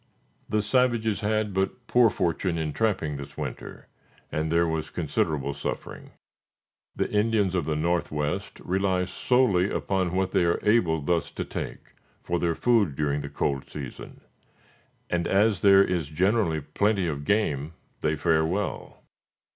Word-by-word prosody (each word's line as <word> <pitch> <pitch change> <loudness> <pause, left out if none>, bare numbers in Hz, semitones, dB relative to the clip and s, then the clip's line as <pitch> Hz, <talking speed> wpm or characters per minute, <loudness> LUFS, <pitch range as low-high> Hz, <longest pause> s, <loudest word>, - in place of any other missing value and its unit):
The 105 -1 +1
savages 115 -2 +1
had 110 -1 0
but 95 +6 -2
poor 120 -2 +5
fortune 90 -2 -1
in 80 -2 -2
trapping 95 -9 0
this 70 0 -9
winter, - - -7 0.4
and 80 +1 -1
there 85 0 +3
was 80 -1 -2
considerable 70 -3 -1
suffering. 70 - -6 0.9
The - - 0
Indians 105 -3 +2
of 90 -5 0
the 75 0 -1
northwest 75 -2 -1
rely 95 0 0
solely 100 -3 +2
upon 95 -3 -1
what 95 0 0
they - - +3
are 85 0 +2
able 90 -8 +3
thus 85 +3 0
to - - -5
take, - - -7 0.3
for 85 0 -1
their 85 -1 0
food 110 - +2
during 75 0 0
the 70 - -6
cold 70 -1 -2
season; 70 -4 -8 0.9
and, 85 -1 -1
as 100 0 +2
there 100 -1 +7
is 90 -6 -1
generally 90 -1 +1
plenty 95 +7 0
of 75 -3 -3
game, 80 -6 0 0.3
they 75 0 0
fare 80 +1 +2
well. 90 +5 -3
90 Hz, 145 wpm, -26 LUFS, 80-105 Hz, 0.9 s, there